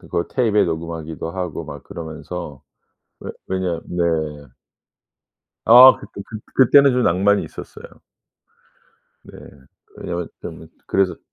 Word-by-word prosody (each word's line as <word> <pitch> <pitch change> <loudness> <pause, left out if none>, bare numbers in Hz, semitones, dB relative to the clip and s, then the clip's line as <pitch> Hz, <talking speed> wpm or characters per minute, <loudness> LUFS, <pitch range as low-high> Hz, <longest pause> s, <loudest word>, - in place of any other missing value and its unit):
그걸 85 - -3
tape에 110 -6 +2
녹음하기도 80 -1 -5
하고 90 -3 -5
막 - - -9
그러면서 80 -2 -8 0.6
왜 - - -6 0.2
왜냐 90 -3 -2
네. 90 0 -3 1.6
아 125 +3 +9
그때 100 - -10
그 110 - -8 0.2
그때는 140 +1 +6
좀 125 0 +1
낭만이 100 +3 +2
있었어요. - - -11 1.4
네. - - -14 0.6
왜냐하면 85 -1 -5
좀 - - -9 0.2
그래서 95 -2 0
90 Hz, 250 characters per minute, -20 LUFS, 85-105 Hz, 1.6 s, 아